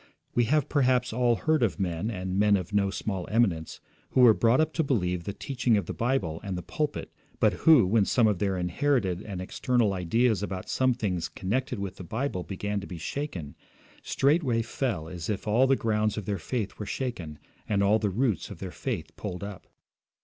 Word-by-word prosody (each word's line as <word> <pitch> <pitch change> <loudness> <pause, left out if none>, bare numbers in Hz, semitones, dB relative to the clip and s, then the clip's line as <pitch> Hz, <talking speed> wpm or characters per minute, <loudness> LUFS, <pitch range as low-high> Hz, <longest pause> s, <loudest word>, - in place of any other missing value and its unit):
We 120 - +3
have 150 +3 +2
perhaps 130 -4 +2
all 120 0 +3
heard 155 +3 +1
of 115 -3 +1
men, 90 +2 -1
and 95 -2 -3
men 105 -1 +5
of 95 +2 -6
no 100 -1 +2
small 95 -2 -3
eminence, 100 -8 +1 0.3
who 130 - +4
were 120 -3 +8
brought 115 +3 +3
up 155 0 +1
to 160 - +1
believe 90 - 0
the 100 - -2
teaching 125 -1 0
of 100 - -1
the - - -4
Bible 110 -10 -1
and 95 -3 -3
the 90 - -5
pulpit, 150 -1 -3 0.3
but - - +4
who, 155 -10 +6
when 105 +2 +3
some 120 +2 +3
of 105 -4 +2
their 100 -2 0
inherited 95 0 0
and 100 -4 -6
external 110 +3 0
ideas 110 +5 +1
about 95 -2 -5
some 130 -1 +2
things 95 -8 -2
connected 125 +7 -2
with 100 -2 -5
the - - -8
Bible 110 +1 -2
began 100 +2 -3
to 100 - -8
be 90 - -7
shaken, 85 - -5 0.5
straightway 135 -5 +2
felt 110 - -3
as 85 -3 -6
if 105 0 -3
all 120 +5 +4
the 135 - +4
grounds 110 -3 0
of 105 - -4
their 100 -1 -2
faith 105 +4 -3
were 105 - -5
shaken, 100 - -4 0.3
and 100 -1 +2
all 105 +2 +4
the 105 - 0
roots 110 -1 0
of - - -8
their - - -6
faith - - -4
pulled 90 +1 -5
up. 100 -2 -8
105 Hz, 205 wpm, -27 LUFS, 95-125 Hz, 0.5 s, were